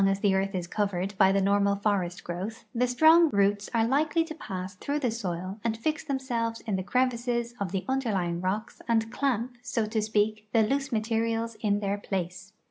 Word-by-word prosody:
as 195 0 0
the 200 -2 +3
earth 195 +1 0
is 180 -2 -2
covered 195 0 -1
hy 190 - +6
the 195 - +3
normal 200 +1 +3
forest 195 -4 -1
growth 190 +6 -5
the 250 +1 +2
strong 315 +6 +6
roots 200 -1 +1
are 230 -1 +2
likely 300 +5 +2
to 325 -1 -7
pass 190 -10 -6
through 285 +10 -2
the 255 -6 0
soil 190 -2 -4
and 225 -1 0
fix 305 +7 -1
themselves 245 -5 -2
in 215 -4 -2
the 190 - -1
crevices 240 +1 0
of 195 -4 -2
the 190 -1 -2
underlying 200 -10 0
rocks 205 +5 -3
and 225 -1 +1
clamp, 245 -2 -1
so 230 -3 -1
to 220 +1 -1
speak, 215 0 0
the 225 - +5
loose 275 +5 0
materials 225 0 0
in 205 -1 +1
their 200 0 -1
place. 190 0 -4
215 Hz, 195 wpm, -28 LUFS, 195-240 Hz, -, hy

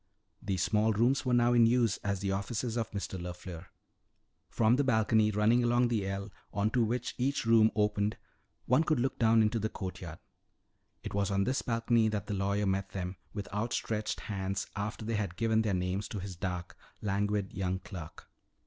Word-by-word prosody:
These 95 -3 -1
small 110 +1 +2
rooms 125 +6 +2
were 125 - +2
now 120 0 +4
in 120 -1 +6
use 115 -3 +2
as 100 -2 -2
the 100 -1 -1
offices 110 +4 -2
of 115 -2 -1
Mr. 95 -2 -5
LeFleur. 90 -1 -7 0.8
From 115 +1 +3
the 145 - +3
balcony, 110 -3 +3
running 110 +4 +3
along 120 0 +3
the 105 -5 0
ell, 100 +1 -4 0.2
onto 110 +4 +1
which 120 +2 -1
each 135 0 0
room 115 -1 +6
opened, 105 0 +1 0.5
one 130 +6 +4
could 155 -4 +1
look 130 +2 -1
down 115 -1 +5
into 110 +2 +1
the 110 +1 -1
courtyard. 90 -5 -6 0.9
It - - -6
was 100 -1 +1
on 100 0 +1
this 130 +5 0
balcony 115 -1 +2
that 105 -3 -2
the 105 - -4
lawyer 100 +1 0
met 95 0 -1
them 90 -1 -4
with 100 -2 -5
outstretched 110 0 -2
hands 95 -1 -3
after 105 +2 -4
they 115 -1 -1
had 100 -5 -3
given 110 +1 +2
their 105 -4 0
names 90 +3 -2
to 105 - -5
his 95 -1 -6
dark, 90 -1 -4 0.3
languid 100 -1 0
young 95 -1 -1
clerk. 95 -5 -9
105 Hz, 185 wpm, -31 LUFS, 95-115 Hz, 0.9 s, in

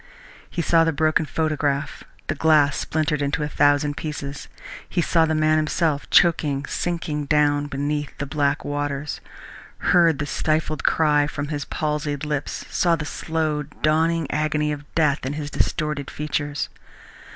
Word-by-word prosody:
He 170 - -2
saw 165 +2 +4
the 165 - +2
broken 155 +1 +1
photograph, 150 -2 -1 0.2
the - - -1
glass 150 -2 +4
splintered 155 -1 -1
into 145 +2 0
a - - -1
thousand 145 0 +2
pieces. 145 -2 -5 0.4
He 180 - -1
saw 165 -1 +3
the 160 - 0
man 155 0 +3
himself, 155 -1 0
choking, 145 -5 +3
sinking 155 -3 -2
down 145 0 +2
beneath 145 +1 -3
the 140 - -3
black 145 0 0
waters; 145 0 -3 0.6
heard 170 -4 +4
the 145 - -2
stifled 155 0 -1
cry 150 -2 +3
from 145 0 -4
his 145 -2 -3
palsied 150 -1 -2
lips, 150 -1 -3
saw 170 -1 +3
the 150 -2 -5
slow 155 -1 -2
dawning 160 +3 +1
agony 150 0 0
of 145 -1 -5
death 150 -3 +2
in 130 +2 -2
his 150 -1 -5
distorted 150 -2 -1
features. 145 -1 -3
150 Hz, 150 wpm, -23 LUFS, 145-155 Hz, 0.6 s, saw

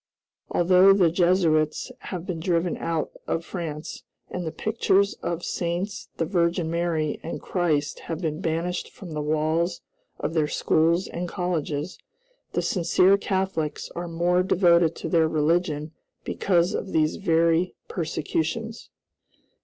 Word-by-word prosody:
Although 185 +2 +6
the 180 -4 +4
Jesuits 170 -4 +2 0.2
have 180 -2 -5
been 175 -3 -4
driven 170 0 0
out 165 -2 -2 0.2
of 165 0 -1
France, 160 -4 -5 0.3
and 180 -2 -4
the - - -2
pictures 200 -2 +1
of 170 0 -3
Saints, 175 +3 -3
the 165 - 0
Virgin 170 -1 +1
Mary, 165 -3 -1
and 165 - -5
Christ, 155 -5 -1
have 165 -2 -2
been 160 -1 -3
banished 170 +2 -2
from 175 -6 -10
the 150 - -2
walls 155 +3 0 0.4
of - - -2
their 155 -3 +2
schools 165 +4 +2
and 175 +1 -4
colleges, 170 -3 -2 0.5
the - - 0
sincere 180 +1 +4
Catholics 190 -6 -2
are 175 0 -4
more 175 +2 +2
devoted 170 -3 +4
to - - -5
their 160 -1 +3
religion 155 0 0 0.3
because 175 -2 +1
of 195 - -4
these 155 -1 +2
very 170 -1 +2
persecutions. 175 +7 -3
170 Hz, 135 wpm, -25 LUFS, 160-180 Hz, 0.5 s, Although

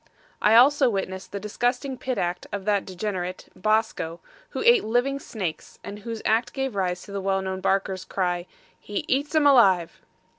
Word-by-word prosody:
I 215 - +5
also 270 +2 +6
witnessed 190 -2 -4
the 200 - -4
disgusting 245 +6 -1
pit 255 0 -3
act 175 +1 -2
of 200 -1 -4
that 205 -2 +1
degenerate, 185 -1 -4
Bosco, 215 -5 0 0.3
who - - -4
ate 475 -1 +6
living 245 +5 0
snakes, 190 - -6
and 200 +1 -7
whose 225 +1 -6
act 225 +2 +1
gave 270 -2 -2
rise 180 -2 -1
to - - -12
the 200 0 -3
well 195 0 0
known 190 0 -4
barkers' 190 -1 0
cry 180 -2 -2 0.3
HE 205 - -4
EATS 285 +4 0
'EM 310 -2 +4
ALIVE! 195 -11 +4
205 Hz, 175 wpm, -25 LUFS, 190-245 Hz, 0.3 s, also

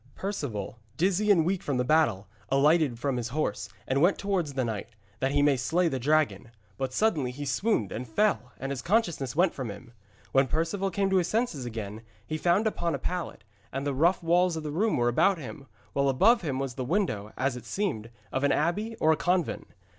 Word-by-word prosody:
Perceval, 135 - -4 0.2
dizzy 195 +4 +1
and 170 -6 +5
weak 185 +1 0
from 140 -3 -2
the 125 - +2
battle, 125 -9 +2 0.2
alighted 145 -1 +3
from 130 +1 -1
his 120 -1 -2
horse, 120 -6 -2 0.2
and 135 +2 +1
went 180 +4 +4
towards 190 -7 -1
the 130 -2 0
knight, 110 -3 -4 0.3
that 135 - +1
he 145 0 +3
might 140 -3 +3
slay 170 +8 +1
the 135 -5 -1
dragon. 135 -7 +1 0.3
But 135 -1 -3
suddenly 150 - +1
he 140 +4 -6
swooned 135 - 0
and 125 +3 -5
fell 125 - +1
and 135 +1 -4
his 135 - -3
consciousness 170 - 0
went 175 +2 +3
from 130 -4 -5
him. 115 +4 -10 0.4
When 135 0 +4
Perceval 170 +7 -1
came 195 +1 0
to 190 - +4
his 180 -2 +2
senses 215 - -1
again, 110 -2 -6 0.2
he 155 0 -4
found 175 +7 +2
himself 220 - -1
upon 170 -1 0
a - - -2
pallet, 175 - -4 0.3
and 135 +1 -3
the 145 - 0
rough 170 +7 +2
walls 175 0 +3
of 155 - -6
a 150 - -3
room 210 +8 +1
were 120 -1 +2
about 185 +11 +3
him, 135 -1 -9 0.3
while 140 0 +2
above 215 - +4
him 145 -7 -2
was 135 -2 -3
the 130 - -4
window, 125 - -1
as 135 -1 0
it 120 -2 -9
seemed, 115 - -2 0.2
of 130 - -1
an 140 - +3
abbey 205 +9 0
or 160 -7 +3
convent. 175 +1 0
145 Hz, 215 wpm, -28 LUFS, 125-180 Hz, 0.4 s, and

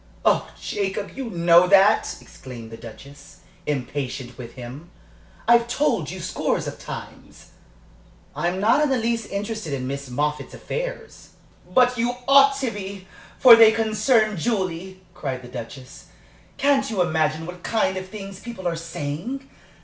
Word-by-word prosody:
Oh, - - +3
Jacob, 200 0 -3
you 265 -3 -5
know 170 -1 +5
that!" 200 +3 +4
exclaimed 120 -3 -11
the - - -7
Duchess, 140 +6 -13 0.3
impatient 130 -2 -3
with 120 -1 -9
him. 130 +7 -9 0.6
"I've 235 0 +5
told 265 +5 0
you - - -6
scores - - -1
of - - -6
times." - - -10 0.8
"I'm 175 +2 -1
not 220 +9 +4
in 300 - +2
the 265 - +2
least 230 -1 -1
interested 200 -4 -4
in 130 -2 -3
Miss 140 0 -5
Moffatt's 150 +4 -2
affairs." - - -6 0.4
"But 250 -1 +4
you 240 +1 0
ought 275 0 +6
to 255 -3 0
be, 195 -2 -7 0.3
for 245 -3 +10
they 225 -1 +8
concern 220 -1 +2
Julie," 185 -2 -2
cried 135 -7 -5
the - - -9
Duchess. 125 +2 -9 0.5
"Can't 275 -1 +2
you 200 -5 +1
imagine 160 -1 0
what 180 +1 -9
kind 215 -3 0
of 185 0 -6
things 195 -2 -8
people 195 -4 -6
are 170 - 0
saying? 165 - -5
190 Hz, 150 wpm, -23 LUFS, 150-230 Hz, 0.8 s, for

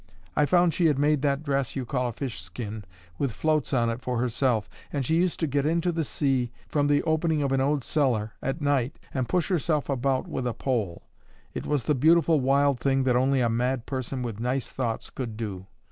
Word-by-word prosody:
I 150 - +3
found 175 -1 +4
she 170 - +3
had 150 -3 +2
made 145 0 +2
that 140 0 0
dress 140 -3 -1
you 130 -2 -2
call 125 0 -1
a - - -4
fishskin 110 -3 -6 0.3
with 140 -3 0
floats 155 +4 0
on 115 -3 +2
it 115 +2 -5
for 125 -1 -2
herself, 120 -2 +1 0.2
and 140 -3 -1
she 160 +6 +2
used 180 0 +1
to - - +3
get 140 -1 0
into 170 +3 +1
the 165 -1 -1
sea, 135 -4 0 0.2
from 145 -1 +1
the 145 0 +3
opening 160 -1 +1
of 140 - 0
an 135 0 +2
old 140 0 +1
cellar, 120 -9 +1
at 135 +4 -3
night, 140 -1 +1 0.2
and 130 -3 -1
push 180 0 +1
herself 155 -5 0
about 135 0 0
with 125 -2 -3
a 120 - -2
pole. 115 -10 -2 0.5
It - - -5
was 145 -4 0
the 150 - +2
beautiful 160 +3 +4
wild 140 0 +3
thing 135 -1 +2
that 125 -2 +2
only 130 +1 +3
a 120 - +3
mad 120 +1 0
person 130 -1 -3
with 115 -3 -5
nice 125 +2 -1
thoughts 120 -4 -3
could 115 -5 -5
do. 100 -4 -5
135 Hz, 215 wpm, -26 LUFS, 120-150 Hz, 0.5 s, found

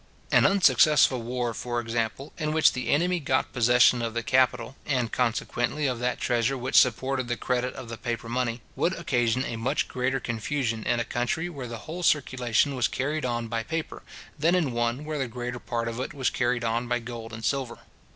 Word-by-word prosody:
An - - +6
unsuccessful 150 -7 +4
war, 120 0 -2
for 120 +1 -3
example, 115 +3 -3
in 155 -1 -1
which 160 0 +5
the 125 -1 -3
enemy 175 +4 +2
got 130 -3 0
possession 120 0 +5
of 115 -1 -3
the 115 - -1
capital, 125 0 +2
and 125 -5 -1
consequently 120 +4 -1
of 125 -3 -1
that 125 0 -1
treasure 120 +3 +1
which 130 +1 -3
supported 130 +1 +3
the 120 0 -2
credit 125 0 -1
of 120 - -8
the 115 -1 -7
paper 115 0 -4
money, 120 0 -2
would 180 - +1
occasion 125 -6 0
a 115 - -4
much 130 +6 0
greater 130 +1 -1
confusion 115 0 -2
in 120 - +2
a 120 - -1
country 125 +8 -1
where 140 -7 -7
the 115 0 -6
whole 170 +3 -6
circulation 130 -4 +2
was 125 -4 +1
carried 145 +2 -2
on 120 -1 -2
by 115 0 -2
paper, 160 +6 -4 0.4
than 165 +4 +3
in 160 -7 +1
one 120 +4 -1
where 155 -1 -3
the 135 - -1
greater 120 +1 -5
part 115 -1 -3
of 115 +1 -4
it 130 - -4
was 130 -3 0
carried 120 -1 0
on 115 +1 -1
by 120 0 +1
gold 115 -1 -7
and 110 0 -6
silver. 130 0 -1
125 Hz, 200 wpm, -26 LUFS, 115-135 Hz, 0.4 s, An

